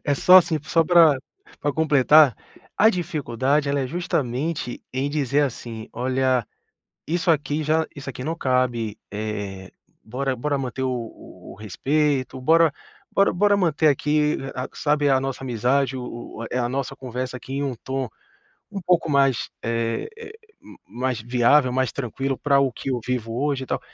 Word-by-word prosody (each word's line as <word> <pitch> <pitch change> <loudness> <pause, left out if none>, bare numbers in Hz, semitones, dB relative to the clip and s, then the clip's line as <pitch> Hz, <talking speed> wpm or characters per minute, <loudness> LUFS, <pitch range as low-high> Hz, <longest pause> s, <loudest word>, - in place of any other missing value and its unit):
é 145 - +2
só, 180 +6 +7
assim, 165 -3 +1
só 165 +3 +3
pra 165 -5 +6 0.4
pra 145 - 0
completar, 150 -3 +5 0.4
a 220 - +7
dificuldade 145 - 0
ela 140 0 +1
é 130 - -1
justamente 145 -3 -2
em 135 +2 -1
dizer 145 -1 +1
assim: 115 -4 -4
"Olha, 130 -1 0 0.6
isso 175 +2 0
aqui 150 0 0
já 160 +1 +1
isso 140 -1 -8
aqui 125 - -8
não 165 +4 -3
cabe, 125 -6 0
eh, 105 -3 -5 0.3
bora, 130 +3 -2
bora 145 +3 -1
manter 130 0 -4
o 125 -3 -3 0.4
o - - -11
respeito, 130 +6 -1
bora, 160 +2 +4 0.4
bora, 195 - +3
bora 205 +2 +3
manter 160 -4 +2
aqui 150 +1 +2 0.2
a 125 +1 -4
sabe, 145 -1 +1
a 135 -1 +4
nossa 135 0 -4
amizade 130 +2 0
o 125 - -5 0.4
o - - -4
eh, 125 - -1
a 120 -1 0
nossa 135 +1 -3
conversa 125 0 -5
aqui 135 +2 -8
em 140 - -1
um 130 -3 -2
tom, 135 -1 -3 0.7
um 195 -2 -5
pouco 175 -1 +2
mais, 135 -3 +2
eh 115 - -2
eh, 455 -2 -9 0.6
mais 125 -2 -3
viável, 125 +3 +3
mais 130 0 0
tranquilo 135 +1 -3
pra 140 -2 +3
o 135 -2 +2
que 135 - -6
eu 125 -2 -1
vivo 115 -3 -2
hoje 140 -2 -1
e 130 - -10
tal, - - -1
135 Hz, 170 wpm, -23 LUFS, 125-150 Hz, 0.7 s, só